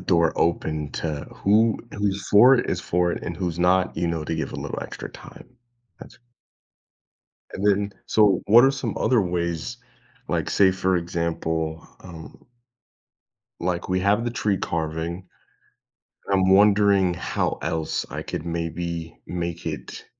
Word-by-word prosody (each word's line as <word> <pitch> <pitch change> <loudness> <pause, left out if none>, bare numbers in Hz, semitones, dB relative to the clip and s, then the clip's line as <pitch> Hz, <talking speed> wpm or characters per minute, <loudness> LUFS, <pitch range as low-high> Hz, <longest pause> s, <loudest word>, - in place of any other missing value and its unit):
door 85 -3 +2
open 80 -3 -1
to 75 -3 -4
who 110 +2 +2
who's 100 -1 -2
for 120 +6 +7
it, 120 - 0
is - - -1
for 90 0 0
it, - - -5
and 85 - -5
who's 85 -2 -3
not, 90 +1 +2
you 85 - 0
know, 85 -2 -2
to 80 - -2
give - - -3
a - - -5
little - - -5
extra - - -8
time. - - -13 0.5
That's - - -13 1.3
And, 100 - -2
then, 100 0 +2
so 105 -4 +3
what 115 +4 +7
are 135 - +5
some 135 - -4
other 125 -3 +3
ways, 85 +4 -2 0.5
like, - - -1
say, 95 -2 +5
for 95 0 0
example, 80 -2 -2
um 85 -3 -12 1.2
like, 90 +1 -2
we 95 0 +1
have 100 +4 +2
the 120 - -1
tree 105 -4 0
carving. 85 +2 -3 1.0
I'm 95 -1 +3
wondering 100 -2 +4
how 90 - -2
else 80 -1 -2
I - - -4
could 80 - -5
maybe 85 0 -4
make 85 -1 -4
it, - - -6
90 Hz, 150 wpm, -24 LUFS, 85-100 Hz, 1.3 s, for